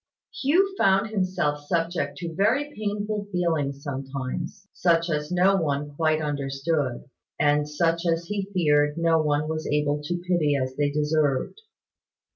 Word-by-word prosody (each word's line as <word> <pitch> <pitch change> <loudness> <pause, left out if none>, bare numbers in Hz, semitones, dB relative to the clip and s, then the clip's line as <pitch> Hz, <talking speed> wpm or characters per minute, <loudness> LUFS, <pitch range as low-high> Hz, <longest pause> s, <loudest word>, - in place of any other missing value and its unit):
Hugh 370 +8 +2
found 195 +2 +3
himself 180 -7 0
subject 165 -4 -1
to 165 +1 -5
very 255 - +1
painful 210 0 -3
feelings 155 -6 -1
sometimes 140 +8 -5
such 170 -1 +2
as 150 +1 -2
no 185 +2 +4
one 145 -3 -1
quite 155 0 +1
understood, 140 -2 -2 0.3
and 150 0 +2
such 165 +3 0
as 165 0 +1
he 200 +1 -3
feared 150 -4 +2
no 165 -1 +3
one 150 0 0
was 155 0 -3
able 150 0 0
to 175 +4 -2
pity 160 -5 +2
as 130 -1 -2
they 145 0 +1
deserved. 150 - 0
160 Hz, 140 wpm, -25 LUFS, 145-180 Hz, 0.3 s, no